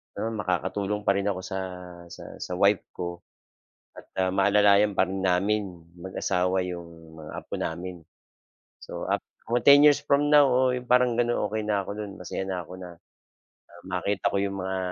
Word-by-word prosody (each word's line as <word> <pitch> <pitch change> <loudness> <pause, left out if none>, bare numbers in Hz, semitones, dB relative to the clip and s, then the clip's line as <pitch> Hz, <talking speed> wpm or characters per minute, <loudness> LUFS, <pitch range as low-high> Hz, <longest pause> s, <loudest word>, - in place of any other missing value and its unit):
Pero 115 - -3
makakatulong 100 0 -2
pa - - +3
rin 100 0 -1
ako 95 -2 -1
sa 95 0 -4 0.5
sa - - -11 0.2
sa 90 - -5
wife 100 +2 +3
ko, 85 -1 -5 0.8
at, - - -12
ah, 95 0 +1
maalalayan 100 +1 +4
pa 95 - +4
rin 95 +1 -4
namin 95 +3 +2 0.3
mag-asawa 90 +1 -1
'yong 85 -2 -6 0.3
mga 75 0 -9
apo - - -13
namin. 85 +1 -5 0.8
So, - - -7
ap - - +1 0.3
o 120 - +2
10 140 +2 +7
years 150 -1 +7
from 145 +1 +2
now, 150 -1 +7
oo, 130 -1 +2
parang 125 -1 +3
ganon 120 0 +1
okey 110 0 -3
na 105 -2 +1
ako 95 - -9
no'n 105 -2 -6
masaya 95 +1 -4
na 95 -2 -3
ako 85 - -11
na, 90 -1 -9 0.8
ah, 85 0 -16
makita 95 +2 -1
ko - - 0
'yong 100 0 -2
mga 95 0 -3
100 Hz, 175 wpm, -26 LUFS, 90-105 Hz, 0.8 s, 10